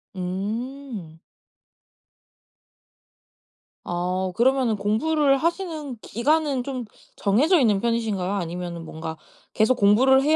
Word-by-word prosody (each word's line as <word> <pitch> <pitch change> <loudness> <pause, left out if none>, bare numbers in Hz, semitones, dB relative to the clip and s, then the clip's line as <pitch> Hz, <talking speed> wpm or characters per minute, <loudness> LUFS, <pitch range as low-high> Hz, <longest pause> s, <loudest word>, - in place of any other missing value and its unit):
음. 205 - -5 2.7
아. 180 +1 -1
그러면은 255 -2 +3
공부를 275 +8 +2
하시는 320 -4 -2
기간은 285 +1 +1
좀 255 -3 -4 0.3
정해져 290 - +3
있는 215 -6 +3
편이신가요? 220 -5 0
아니면은 175 -2 -4
뭔가 160 0 -6 0.4
계속 220 +4 +3
공부를 245 +6 +5
230 Hz, 215 characters per minute, -24 LUFS, 185-275 Hz, 2.7 s, 공부를